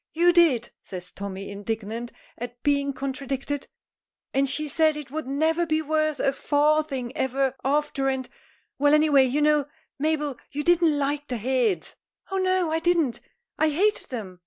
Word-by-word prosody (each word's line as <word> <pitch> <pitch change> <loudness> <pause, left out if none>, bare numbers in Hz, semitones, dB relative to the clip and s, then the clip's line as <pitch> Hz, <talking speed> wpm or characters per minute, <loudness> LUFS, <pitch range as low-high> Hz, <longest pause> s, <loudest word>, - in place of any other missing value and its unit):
"You 345 +2 +4
did!" 305 -10 +4
says 180 -1 -9
Tommy, 195 0 -6
indignant 220 +3 -4 0.2
at 245 +1 -8
being 280 -1 +2
contradicted, 275 +1 -4 0.7
"and 270 0 +2
she 305 +3 -2
said 310 +1 +2
it 290 -4 -8
would 310 -2 -4
never 320 +5 +1
be 310 0 +2
worth 310 -1 0
a 275 - +2
farthing 290 -3 +1
ever 265 0 0
after, 280 -1 +1
and 260 -1 -2 0.5
Well, 290 +1 +5
any 305 0 +3
way, 275 -2 +6
you 280 +4 +1
know, 300 -2 +3 0.3
Mabel, 300 -3 0
you 295 +1 -3
didn't 335 -3 +4
like 290 +1 -1
the 250 - -3
heads." 230 -6 0 0.4
"Oh, 385 - 0
no; 370 -3 +1
I 320 - +1
didn't 330 -7 +1 0.4
I 315 - +4
hated 400 +8 +1
them! 200 -8 -6
285 Hz, 160 wpm, -25 LUFS, 255-310 Hz, 0.7 s, way